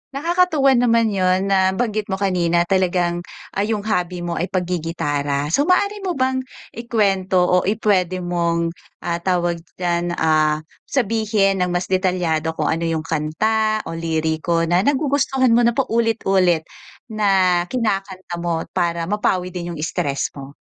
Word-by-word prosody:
Nakakatuwa 320 -2 +2
naman 230 -3 +3
'yon. 185 0 +1
Nabanggit 200 +3 +1
mo 190 - -1
kanina 175 -3 +1
talagang, 175 -1 +1 0.3
ah, - - -4
'yong 215 -2 -1
hobby 180 -4 -2
mo 170 -1 -3
ay 180 - -1
paggi-gitara. 155 -6 -2
So 285 - +2
maaari 405 +3 +2
mo 370 -3 -3
bang 260 0 +1 0.3
ikwento 200 -5 0
o 180 0 +3
i 210 - +2
pwede 185 -4 0
mong, 170 -1 0 0.3
ah, 170 0 -2
tawag 175 -1 0 0.2
diyan, 175 -1 -1
ah, 155 -1 +2 0.2
sabihin 215 -5 +1
ng 180 - +1
mas 180 +1 -2
detalyado 175 -4 0
kung - - 0
ano 165 +1 -1
'yong 160 -1 -1
kanta 215 +8 0
o - - -7
liriko 165 0 -1
na 175 +2 +2
nagugustuhan 270 0 +1
mo 230 - +5
na 235 - +1
paulit-ulit 195 - +1 0.5
na 190 -4 +3
kinakanta 195 -6 -3
mo 170 -1 -1
para 170 -2 -1
mapawi 185 -3 0
din 175 -1 -5
'yong - - -9
stress 140 -3 -2
mo? 140 +1 -10
185 Hz, 145 wpm, -20 LUFS, 170-215 Hz, 0.5 s, mo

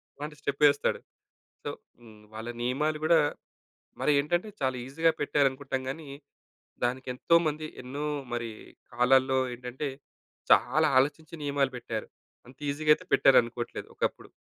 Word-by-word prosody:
అలాంటి 150 +1 -7
స్టెపేస్తాడు. 145 0 +2 0.7
సో, - - -2 0.3
హ్మ్, 110 -3 -16
వాళ్ళ 110 +2 -6
నియమాలు 150 +5 0
కూడా 160 0 +5 0.8
మరేంటంటే, 150 +7 +2
చాలా 130 -1 0
ఈజీగా 160 +5 +2
పెట్టారనుకుంటాం 135 -2 0
గాని, 150 +2 -7 0.8
దానికేంతోమంది, 150 +5 +1
ఎన్నో 140 +4 -5 0.3
మరి 115 -1 -3 0.4
కాలాల్లో 130 +2 +4 0.2
ఏంటంటే, 125 +4 -5 0.6
చాలా 150 +6 +4
ఆలోచించి 150 +4 0
నియమాలు 140 -2 +1
పెట్టారు. 115 -2 -5 0.4
అంత 130 +1 -16
ఈజీగా 150 +2 +3
అయితే 185 - -13
పెట్టారనుకోవట్లేదు 120 -2 +3
ఒకప్పుడు. - - -3
135 Hz, 110 wpm, -28 LUFS, 125-150 Hz, 0.8 s, కూడా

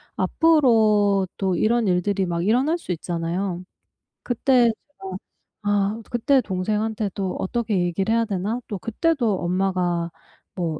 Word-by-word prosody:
앞으로도 210 - +3
이런 225 +4 +2
일들이 190 +2 +1
막 170 -1 -2
일어날 260 - +2
수 190 - -6
있잖아요. 175 +2 -3 0.6
그때 250 0 +3 0.4
제가 190 -1 -5 0.5
'아, 205 +2 0
그때 265 +3 +2
동생한테 210 +2 -2
또 190 -2 -3
어떻게 225 +1 -1
얘기를 180 +4 0
해야 230 0 +2
되나?' 205 +3 -2
또 205 - -4
그때도 230 - 0
엄마가 180 -2 0 0.4
뭐 165 -4 -2
200 Hz, 265 characters per minute, -23 LUFS, 185-230 Hz, 0.6 s, 앞으로도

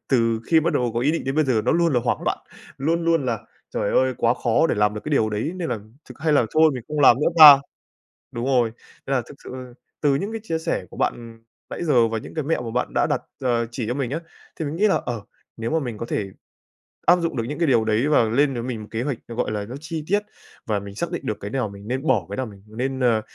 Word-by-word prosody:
từ 115 -3 +2
khi 160 -1 +4
bắt 165 - 0
đầu 125 -1 +1
có 120 - 0
ý 145 +5 +2
định 165 - -2
đến 135 +1 -2
bây 155 -1 +3
giờ 115 -5 +1
nó - - +3
luôn 170 -2 +2
là 125 - +3
hoảng - - 0
loạn, - - 0 0.4
luôn 165 +4 0
luôn 165 -4 +2
là 115 -3 0 0.3
"Trời - - -1
ơi, 130 0 +2
quá 115 +1 +3
khó 120 +8 +2
để - - 0
làm 105 0 +2
được 105 - -5
cái 155 - -4
điều 110 -6 +2
đấy, 105 +10 -2
nên 175 -3 -3
là 110 - -2 0.3
thực - - -12
hay 155 -1 +2
là 125 -6 +4
thôi 160 0 +6
mình 125 - -5
không 150 -1 -2
làm 130 -4 +7
nữa - - +2
ta," 145 -3 +11 0.7
đúng 120 +1 -4
rồi, 125 -4 +2 0.4
nên 135 - +1
là 125 - +2
thực 145 - -11
sự 125 -1 -8 0.3
từ 145 -2 +3
những 200 +10 -2
cái 225 - -4
chia 165 -6 -2
sẻ - - -2
của - - -13
bạn, - - +1
ừm, 115 -1 -12 0.3
nãy - - -5
giờ 125 -8 +4
và 115 0 -2
những - - -8
cái 155 -3 -2
mẹo 155 -3 0
mà 115 - -5
bạn 125 +1 -2
đã - - +2
đặt, - - 0 0.2
ờ, 120 -2 +1
chỉ 120 -2 -4
cho 120 - -1
mình 135 -2 -2
á, 160 - -1 0.4
thì 160 - -4
mình 145 +2 -4
nghĩ 210 +5 +3
là, 195 - +3
ờ, 120 -4 -3 0.4
nếu 115 +4 -3
mà 160 - +2
mình 120 -6 -5
có 115 - -4
thể 100 -4 -3 0.7
áp 175 - +6
dụng 165 -4 -2
được 115 - 0
những 145 +7 -5
cái 165 - +2
điều 115 -4 +4
đấy 110 +6 +1
và 150 -6 +4
lên 135 +5 +2
với 120 - -4
mình 120 -3 -4
một 105 - -9
kế 115 +2 -2
hoạch, 140 -5 -2
nó, 115 - -7
gọi 115 - -1
là, 105 -1 -3
nó 120 +5 -8
chi 160 0 -5
tiết 205 +3 +3 0.5
và 105 -2 0
mình 100 0 -9
xác 170 +9 -3
định 175 - -4
được 105 - -2
cái 100 - -6
nào 125 -5 -1
mình 100 +1 -11
nên 130 +5 -3
bỏ, 110 -10 +2
cái 100 - -5
nào 130 - -1
mình 100 -3 -13
nên, 130 +5 -3
ờ, 115 -4 +3
125 Hz, 290 wpm, -23 LUFS, 115-150 Hz, 0.7 s, ta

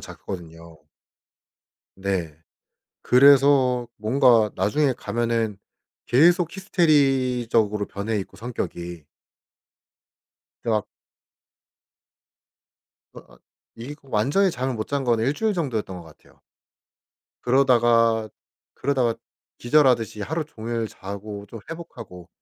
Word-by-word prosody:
잤거든요. 85 -3 -10 1.2
네. 95 -6 -3 0.7
그래서 130 -2 +5
뭔가 115 -1 +3
나중에 125 +8 +1
가면은 115 -3 -2 0.5
계속 170 - +4
히스테리적으로 130 - +1
변해있고 100 0 -4
성격이. 85 - -6 1.6
가 110 -3 0 2.3
아 60 -1 -15 0.4
이 120 +6 -7
그 140 -2 -23
완전히 140 - +2
잠을 130 0 -3
못 110 -1 -4
잔 140 -1 -2
건 120 -2 +2
일주일 150 - 0
정도였던 115 - -3
것 - - -13
같아요. 80 -2 -20 1.0
그러다가 120 -4 +3 0.5
그러다가 125 -4 0 0.4
기절하듯이 120 -5 +2
하루 160 +6 -3
종일 115 -4 -4
자고 100 +1 -8
좀 115 +1 -9
회복하고 115 - -10
115 Hz, 210 characters per minute, -23 LUFS, 105-135 Hz, 2.3 s, 그래서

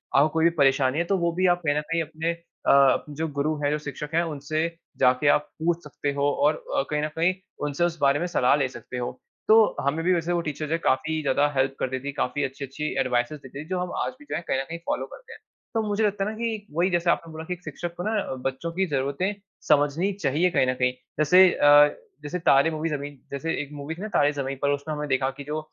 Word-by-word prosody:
आपको 145 +3 +5
कोई 160 0 +1
भी - - +7
परेशानी 135 0 +3
है, - - +2
तो 195 +2 +1
वो 170 -1 +1
भी 185 +2 +1
आप 175 - 0
कहीं 145 -1 +2
न - - +1
कहीं 165 0 +2
अपने 160 +2 -3
अ, 140 -5 +2
जो 160 +3 -3
गुरु 150 +1 -1
हैं, 145 - +2
जो 150 - +1
शिक्षक 150 +1 -5
हैं, 170 - +3
उनसे 155 +1 -2 0.3
जाके 130 +2 +3
आप 150 +1 +3
पूछ 170 0 +1
सकते 145 -1 -3
हो 140 0 +1
और 150 +1 +2
अ, - - +3
कहीं 150 0 0
न - - +1
कहीं 170 +3 +2 0.3
उनसे 145 +3 -1
उस 170 -1 -2
बारे 140 +1 +4
में 175 - -1
सलाह 135 -6 +3
ले 140 -3 +1
सकते 120 +1 -8
हो। 125 +1 -4 0.3
तो 220 -1 +6
हमें 150 +4 0
भी 185 - +4
वैसे 170 0 0
वो 170 - +1
टीचर 155 -1 -4
जो 150 - -7
है, 165 - +2
काफ़ी 155 +1 0
ज़्यादा 145 0 +2
हेल्प 135 0 +1
करती 130 0 -2
थी, 140 +2 -5
काफ़ी 140 +1 -1
अच्छी-अच्छी 140 +2 -5 0.2
एडवाइसेस 125 +3 0
देती 135 +3 -8
थी - - -16
जो 185 - -1
हम 180 0 -3
आज - - -2
भी 290 - -15
जो - - -2
हैं, 170 - -3
कहीं - - +1
न - - -1
कहीं 165 - -4
फॉलो - - -1
करते - - -13
हैं। - - -13 0.3
तो 225 - +1
मुझे 205 +2 0
लगता 200 -1 0
है 210 - -1
ना 220 - -6
कि 225 -3 -3
वही 175 +3 +2
जैसे 175 -1 +1
आपने 165 -1 0
बोला 160 0 -7
कि 180 - -3
एक 180 - -10
शिक्षक 175 -1 -5
को 175 - -4
ना, 215 - -1
अ, 135 - -4
बच्चों 135 +6 -2
की 190 +3 0
ज़रूरतें 140 +7 -1 0.3
समझनी 150 +7 +3
चाहिए 170 -1 +1
कहीं 130 - +2
न 130 - +2
कहीं। 125 0 +1 0.3
जैसे 180 +5 +7
अ, 145 0 +6 0.3
जैसे 150 +5 -3
तारे 140 -2 +4
मूवी 155 +1 -2
ज़मीन 145 -2 -5
जैसे 160 +4 -2
एक 145 - -7
मूवी 145 +3 -6
थी 180 - -10
ना 215 - -3
तारे 145 0 +4
ज़मीन 135 -1 -3
पर 140 - +2
उसमें 145 +2 -2
हमने 150 0 -4
देखा 130 0 +1
कि 140 - -7
जो 150 +2 -3
150 Hz, 260 wpm, -25 LUFS, 140-170 Hz, 0.3 s, भी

